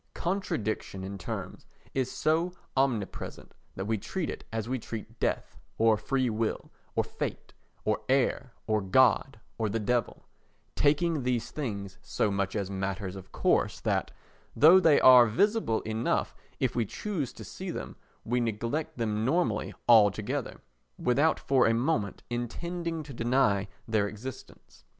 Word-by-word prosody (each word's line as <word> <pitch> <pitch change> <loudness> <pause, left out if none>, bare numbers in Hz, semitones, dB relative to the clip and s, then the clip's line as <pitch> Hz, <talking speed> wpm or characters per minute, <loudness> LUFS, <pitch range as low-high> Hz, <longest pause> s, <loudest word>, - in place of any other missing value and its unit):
Contradiction 110 - -2
in 100 +1 -5
terms - - -6 0.3
is 130 -2 -1
so 165 +3 +1 0.2
omnipresent 130 -7 -2 0.2
that 95 - -4
we 110 0 0
treat 180 - -3
it - - -8
as 110 0 -3
we 130 +1 -1
treat 115 0 -8
death, - - -2 0.2
or 110 -1 +5
free 130 +5 0
will, 110 -1 -2 0.2
or - - +2
fate, - - -5 0.3
or 110 0 +1
air, 130 -1 +1
or 110 -1 +1
God, 130 +5 +3 0.2
or 110 -2 +1
the 110 - -1
Devil—taking 145 +7 -1
these 125 -2 -1
things 100 -9 -5
so 105 - 0
much 100 -1 -1
as 100 -3 -1
matters 95 0 -3
of 95 - -10
course - - +1
that, - - 0 0.5
though 165 +5 +8
they 160 -5 +5
are 125 -2 +8
visible 200 - +1
enough 110 +1 -1 0.3
if 130 -3 0
we 120 - +2
choose 155 - -3
to - - -10
see - - -7
them, - - -5 0.3
we 125 +2 +1
neglect 120 +8 -2
them 110 -2 -1
normally 130 -5 +1 0.2
altogether, 110 +3 +3 0.4
without 140 +6 +2
for 135 -4 +3
a 115 - +3
moment 115 -5 -1
intending 165 +7 -3
to 140 -2 -10
deny 115 -5 +2 0.2
their 110 -3 +2
existence. 115 +5 -10
120 Hz, 145 wpm, -29 LUFS, 105-140 Hz, 0.5 s, though